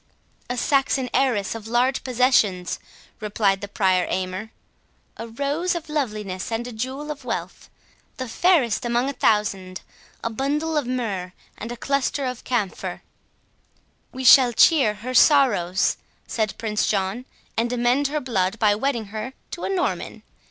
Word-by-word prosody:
"A 245 - -2
Saxon 270 0 +1
heiress 250 -7 +1
of 225 -1 -8
large 245 +3 +1
possessions," 240 -8 +2 0.4
replied 205 -2 0
the 205 - -5
Prior 190 -3 +1
Aymer; 185 +3 -3 0.7
"a 230 - -7
rose 285 +10 -1
of 325 -2 -6
loveliness, 210 -10 -3
and 225 +1 -2
a 245 - -6
jewel 260 +6 -4
of 295 - -8
wealth; - - -5 0.5
the 255 -2 -4
fairest 265 - +2
among 240 +3 0
a - - -10
thousand, 195 -6 0 0.4
a 230 - -1
bundle 295 +7 -1
of 295 -5 0
myrrh, 205 -8 -3 0.2
and 230 +3 -7
a 240 - -6
cluster 275 +1 -1
of 250 -2 -4
camphire." 220 -7 -3 1.1
"We 260 - -6
shall 255 -1 +8
cheer 255 -5 +5
her 250 +5 -6
sorrows," 240 - +4 0.3
said 215 -3 -2
Prince 215 -2 -1
John, 200 +4 -1 0.3
"and 235 +1 0
amend 245 +3 +2
her 300 +2 -1
blood, 225 -6 -1
by 210 -2 +4
wedding 235 +1 -1
her 220 +4 -5 0.2
to 345 - -5
a - - -2
Norman. 380 -2 -2
240 Hz, 150 wpm, -23 LUFS, 210-270 Hz, 1.1 s, shall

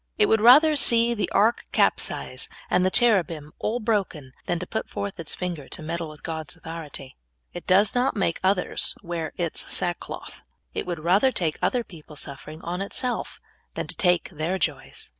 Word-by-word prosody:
It 425 - +5
w^ould 220 - +3
rather 290 +8 +7
see 235 -4 +4
the 215 - -2
ark 225 +3 +2
capsize, - - +1 0.2
and 180 - +3
the 185 - +3
cherubim 175 -10 +2
all 235 +3 -1
broken, 195 - -1 0.2
than 175 - 0
to 180 - -5
put 220 - -4
forth 200 -2 -5
its 165 - -3
finger 175 -6 -5
to 160 - -5
meddle 165 0 -3
with 155 0 -11
God's 160 -2 -5
authority. 155 -5 -8 0.4
It 175 - -8
does 195 +3 +4
not 250 +2 +1
make 190 -5 0
others 190 -1 +2
wear 170 -3 -4
its 170 -3 -2
sackcloth. 175 -1 -3 0.3
It - - -4
w^ould 170 -3 -4
rather 195 +10 +4
take 165 -9 -1
other 250 -2 +1
people's 155 -6 -9
sufferings 155 +2 -8
on 175 +2 -3
itself 245 +5 -2 0.4
than - - -2
to - - -5
take 180 -6 +2
their 165 +3 -1
joys. 175 - -3
180 Hz, 180 wpm, -25 LUFS, 160-220 Hz, 0.4 s, rather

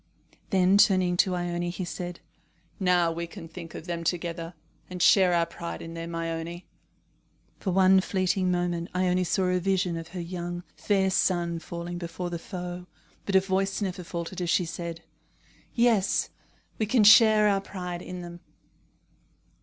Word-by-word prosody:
Then, 190 0 +4
turning 185 -3 +4
to 185 0 +3
Ione, 175 0 -2
he 180 +1 -4
said: 175 0 -6 0.6
"Now 180 -3 +3
we 170 +1 -4
can 170 -1 -10
think 165 0 -10
of - - -8
them 170 -1 -4
together, 170 0 -3 0.3
and 180 0 -6
share 185 0 +5
our 170 -1 +3
pride 170 0 -7
in 165 - -8
them, 165 0 -6
Ione." 165 +1 -4 0.9
For 195 - -3
one 190 +1 +5
fleeting 185 -1 0
moment 175 -1 -1
Ione 180 0 +2
saw 185 +2 0
a 180 0 +1
vision 185 -2 0
of 165 -1 -7
her 180 +1 -7
young, 175 0 -5
fair 195 -2 +1
son 170 -2 +1
falling 170 +1 -6
before 175 +1 -5
the 170 - -3
foe, 180 0 -7 0.4
but 200 - 0
her 190 - +7
voice 195 0 -1
never 185 -3 -3
faltered 170 +1 -5
as 175 - -2
she 180 - +2
said: 170 0 -6 0.7
"Yes, 230 -5 +2 0.5
we 215 - 0
can 230 0 +3
share 215 0 +7
our 200 -1 +2
pride 180 -3 -6
in 180 0 -7
them." 175 0 -9
180 Hz, 160 wpm, -27 LUFS, 170-190 Hz, 0.9 s, her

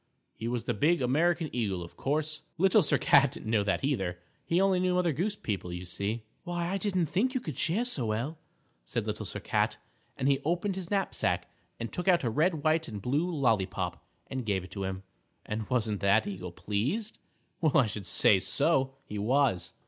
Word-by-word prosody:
He 115 - -5
was 120 -1 -2
the - - -1
big 160 +10 +3
American 160 +6 +2
Eagle, 100 -7 -1
only, - - -5
of 85 - -15
course, 155 +2 -1 0.2
Little 190 +3 +5
Sir 150 - +3
Cat 140 -2 +5
didn't 110 - -5
know 105 -3 +3
that 100 +4 0
either; 95 -11 0 0.3
he 170 - +2
only 190 -1 +3
knew 180 0 +1
Mother 175 -3 +2
Goose 195 +9 -1
people, 100 - -4
you 90 +1 -5
see. 100 +6 -3 0.2
"Why, 175 -1 -2
I 195 +1 -1
didn't 185 -4 +1
think 235 - 0
you - - +2
could 155 - -6
cheer 195 - +1
so 140 - 0
well," 120 +9 -2 0.4
said - - -3
Little - - -3
Sir - - -4
Cat, - - 0 0.4
and 130 - 0
he 140 -1 +3
opened 175 +5 0
his 185 -2 -5
knapsack 195 -2 0 0.3
and 115 -1 -5
took 180 - -4
out 180 -4 +4
a 120 - 0
red, 155 +4 +1
white 155 +1 +2
and 105 -3 -6
blue 145 - 0
lollypop 115 - 0 0.2
and 130 -1 -4
gave 100 -4 -1
it 90 - -12
to 100 +1 -4
him, 95 0 -4 0.4
and 105 0 -4
wasn't 110 -5 0
that 100 +2 +3
eagle 90 -3 -5
pleased? 130 - -2 0.4
Well, 155 -2 +3
I 135 - +6
should 105 -3 -5
say 95 +2 +5 0.6
he 105 - -5
was. 110 -6 +1
135 Hz, 200 wpm, -29 LUFS, 105-175 Hz, 0.6 s, I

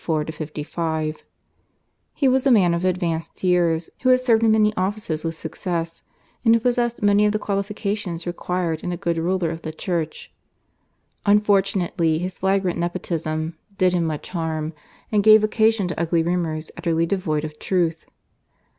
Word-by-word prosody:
He - - -14 2.2
was 260 +1 +3
a - - +5
man 185 -7 +5
of 170 +1 -1
advanced 175 -3 -2
years, 170 -3 +2
who 255 - +2
had 255 0 +6
served 235 -3 +3
in 225 - +4
many 215 -1 +3
offices 185 -5 -2
with 165 -1 -3
success, 165 0 -4 0.4
and 230 -1 +6
who - - +3
possessed 240 -1 0
many 205 +1 +4
of 210 - 0
the - - +2
qualifications 200 -3 -3
required 175 -2 -2
in 180 - -2
a 175 - -3
good 170 -2 -1
ruler 175 0 0
of 165 0 -6
the 155 - -5
Church. 160 -1 -4 0.9
Unfortunately, 195 -5 +2
his 180 +2 -4
flagrant 190 -2 +1
nepotism 165 -2 -3 0.2
did 185 -1 +3
him 175 -2 +1
much 155 -2 -4
harm 160 -2 -3 0.4
and 210 -2 +3
gave 215 +1 +7
occasion 220 -2 +2
to 175 - -4
ugly 170 0 +1
rumours 165 -2 -2
utterly 165 -1 +1
devoid 165 -5 -1
of 155 -1 -7
truth. 170 -4 0
180 Hz, 155 wpm, -22 LUFS, 165-205 Hz, 2.2 s, gave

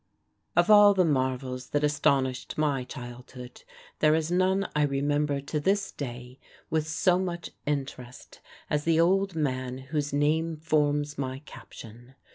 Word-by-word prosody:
Of 215 - +4
all 205 -1 +8
the 185 -2 +3
marvels 130 -3 -1
that 145 0 0
astonished 140 -3 0
my 145 -4 0
childhood, 125 0 -10 0.4
there 155 0 +4
is 160 +1 -1
none 190 +2 +2
I 150 - +2
remember 145 0 0
to 150 +2 -3
this 195 +5 0
day 125 -1 -8 0.3
with 155 -1 0
so 175 +3 +2
much 175 -2 -4 0.2
interest 135 -3 -5 0.3
as 150 0 -1
the 165 0 +2
old 190 +2 +2
man 130 -4 -2 0.2
whose 145 -1 -1
name 155 +3 +1
forms 150 -2 0
my 130 +1 -4
caption. 120 +1 -13
145 Hz, 140 wpm, -27 LUFS, 130-160 Hz, 0.4 s, all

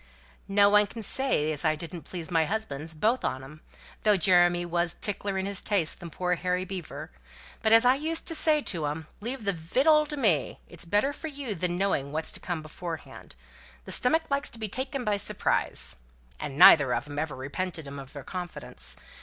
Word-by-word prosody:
"No 200 +1 +5
one 210 0 +5
can 225 +1 -7
say 200 - +3
as 150 -2 -3
I 155 -1 +2
didn't 170 +1 -7
please 175 -1 -4
my 165 -2 +3
husbands 160 -6 -4
both 225 +10 +1
on 130 0 -2
'em, 150 +3 -13 0.4
though 210 -2 +4
Jeremy 175 0 +4
was 175 0 0
tickler 200 -1 -1
in 190 - -1
his 200 -1 -1
tastes 195 -7 +1
than 170 -2 -10
poor 180 +2 -1
Harry 180 +1 -1
Beaver. 185 - -7 0.5
But 220 - +2
as 225 +2 +7
I 250 - +6
used 315 +4 -2
to 335 - +1
say 310 -1 +4
to 165 - -2
'em, 155 +2 -4
'Leave 240 +3 -5
the 200 -1 +1
victual 275 - +3
to 295 0 -5
me; 185 - +1
it's 175 -1 -5
better 205 +11 +1
for 320 - -7
you 280 -6 -5
than 175 -1 -2
knowing 180 -8 0
what's 155 +2 -1
to - - -4
come 170 -4 -4
beforehand. 165 +1 -8 0.5
The - - -8
stomach 320 +5 +2
likes 280 +1 0
to - - -9
be 220 -1 -3
taken 260 +5 -3
by 210 -2 +1
surprise.' - - 0 0.4
And 140 - -5
neither 145 -6 +8
of 120 +4 -4
'em 145 0 -5
ever 155 -3 -3
repented 160 +5 -4
'em 140 0 -7
of 135 -1 -11
their 145 -2 -8
confidence. 180 +3 -5
180 Hz, 205 wpm, -27 LUFS, 160-220 Hz, 0.5 s, neither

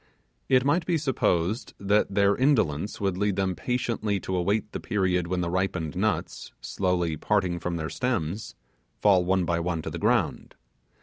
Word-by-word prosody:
It 130 -1 +4
might 165 +4 +2
be 175 -2 +2
supposed 110 - 0
that 100 0 +1
their 100 0 +4
indolence 105 - +1
would 95 -2 -1
lead 105 -1 +1
them 95 -1 0
patiently 110 +2 -1
to 95 - -3
await 100 +4 0
the - - -4
period 90 -5 0
when 90 0 -1
the 85 - -1
ripened 90 -4 -1
nuts, 105 +3 -2
slowly 90 -4 -1
parting 90 -2 0
from 90 0 -3
their 80 -1 -4
stems, 105 -4 -2 0.4
fall 95 -3 +4
one 95 0 +1
by 85 0 0
one 85 -2 -2
to - - -5
the - - -5
ground. - - 0
95 Hz, 170 wpm, -26 LUFS, 90-105 Hz, 0.4 s, It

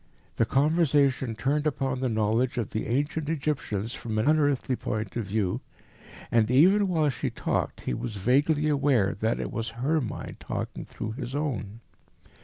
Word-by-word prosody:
The 115 - +2
conversation 140 -4 +2
turned 145 +7 0
upon 135 -3 -1
the 130 -1 0
knowledge 115 +4 +1
of 120 - -2
the 110 - -2
ancient 145 +5 -1
Egyptians 135 -8 -2
from 110 -4 -4
an 110 - +1
unearthly 145 -4 +2
point 105 -4 -4
of 115 -3 -2
view, 105 +2 -1 0.7
and 115 -2 +3
even 190 +11 +5
while 160 -4 +2
he - - -2
talked - - -2
he - - -2
was 110 - -4
vaguely 145 +9 +2
aware 140 -9 +2
that 110 +1 0
it - - -3
was 115 0 -3 0.2
her 155 +1 +2
mind 115 - -6
talking - - -5
through 110 - -5
his 125 +2 -5
own. 115 -7 -3
130 Hz, 165 wpm, -27 LUFS, 110-150 Hz, 0.7 s, even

